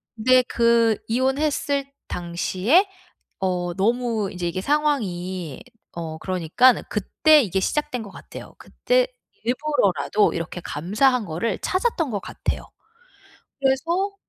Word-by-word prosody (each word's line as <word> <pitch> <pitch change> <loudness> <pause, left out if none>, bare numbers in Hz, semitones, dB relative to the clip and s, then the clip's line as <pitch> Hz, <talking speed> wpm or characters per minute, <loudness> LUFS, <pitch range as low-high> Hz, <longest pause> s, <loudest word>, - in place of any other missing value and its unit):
근데 255 +3 +5
그 235 -2 +3
이혼했을 275 +3 0 0.2
당시에 185 - +1 0.5
어 180 -2 -1
너무 225 0 0
인제 180 -2 -3
이게 170 +2 -3
상황이 190 - -1 0.3
어 160 -2 -6
그러니깐 185 +9 +3
그때 300 +9 +4
이게 195 -5 -1
시작된 255 +3 -1
것 200 - -10
같아요. - - -11
그때 - - 0 0.4
일부러라도 245 -6 +1
이렇게 165 +1 -5
감사한 210 - +1
거를 190 +5 -2
찾았던 370 - 0
것 205 - -2
같아요. - - -4 1.0
그래서 335 +9 +1
230 Hz, 255 characters per minute, -23 LUFS, 185-280 Hz, 1.0 s, 근데